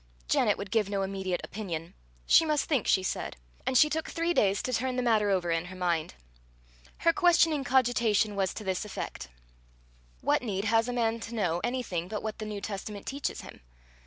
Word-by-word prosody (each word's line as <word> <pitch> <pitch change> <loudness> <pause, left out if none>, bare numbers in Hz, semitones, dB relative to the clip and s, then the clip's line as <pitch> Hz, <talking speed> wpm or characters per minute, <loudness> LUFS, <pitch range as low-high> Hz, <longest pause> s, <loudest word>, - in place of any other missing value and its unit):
Janet - - +3
would 200 -1 -6
give 215 -3 +2
no 200 -1 -1
immediate 190 -2 -2
opinion. 170 -6 -5 0.3
She - - +6
must 305 -3 +1
think, 275 -9 0
she 190 - +3
said; - - -3 0.3
and 255 - +3
she 300 - +7
took 315 +1 -2
three 335 +1 0
days 200 - +2
to 255 - -2
turn 255 +2 0
the 250 - 0
matter 220 -4 +3
over 180 -3 +1
in 165 +1 0
her 185 +1 -9
mind. 170 - -1 0.9
Her 335 - +6
questioning 335 -5 +4
cogitation 235 -5 +2
was 195 -2 0
to 215 - -6
this 190 -1 -1
effect: 210 - -6 0.9
"What - - +2
need 200 -4 -2
has 225 +2 +3
a - - -1
man 230 -1 0
to 230 +1 -7
know 175 -5 0
anything 235 -9 -2
but 210 +2 -4
what 220 0 -4
the 215 - -4
New 210 -1 -5
Testament 200 0 -6
teaches 280 +1 -3
him? - - -12
215 Hz, 195 wpm, -29 LUFS, 190-250 Hz, 0.9 s, she